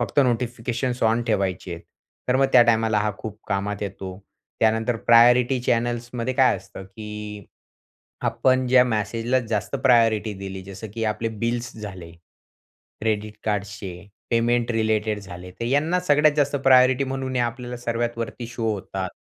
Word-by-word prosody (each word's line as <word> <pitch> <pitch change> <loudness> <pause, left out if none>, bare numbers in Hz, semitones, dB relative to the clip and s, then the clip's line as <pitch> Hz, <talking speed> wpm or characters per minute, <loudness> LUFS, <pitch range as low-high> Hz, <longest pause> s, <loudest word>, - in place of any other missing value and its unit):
फक्त 120 +2 -2
notifications 120 +1 -2
on 115 +1 +3
ठेवायचे, 95 -5 -1 0.5
तर 125 - +3
मग 135 +1 +4
त्या 120 - +8
टायमाला 115 -2 +2
हा 105 +1 +1
खूप 105 -1 -7
कामात 100 +1 -2
येतो. 95 -2 -6 0.4
त्यानंतर 110 +2 +2
प्रायोरिटी 125 +2 +6
चॅनल्समध्ये 120 +1 -1
काय 130 -1 +4
असतं, 95 - -11
की 105 0 -8 0.8
आपण 130 0 +2
ज्या 125 0 +6
मेसेजला 115 +2 0
जास्त 105 -2 -1
प्रायोरिटी 115 -4 +3
दिली, 95 -1 -7
जसं 100 +3 -9
की 115 -1 -2
आपले 115 +1 -3
बिल्स 120 +1 -1
झाले, 95 -6 -8 0.9
क्रेडिट 110 -1 -2
कार्ड्सचे, 100 -3 -4 0.2
पेमेंट 120 0 +2
रिलेटेड 110 -1 0
झाले, 90 -2 -10
तर 105 - -7
यांना 150 +8 +1
सगळ्यात 150 +1 +5
जास्त 145 -1 +2
प्रायोरिटी 130 0 +5
म्हणून 130 0 -4
हे - - +2
आपल्याला 120 +1 -4
सर्वात 120 0 -2
वरती 115 +1 -5
शो 115 -1 -2
होतात. 95 -2 -4
115 Hz, 145 wpm, -23 LUFS, 105-125 Hz, 0.9 s, त्या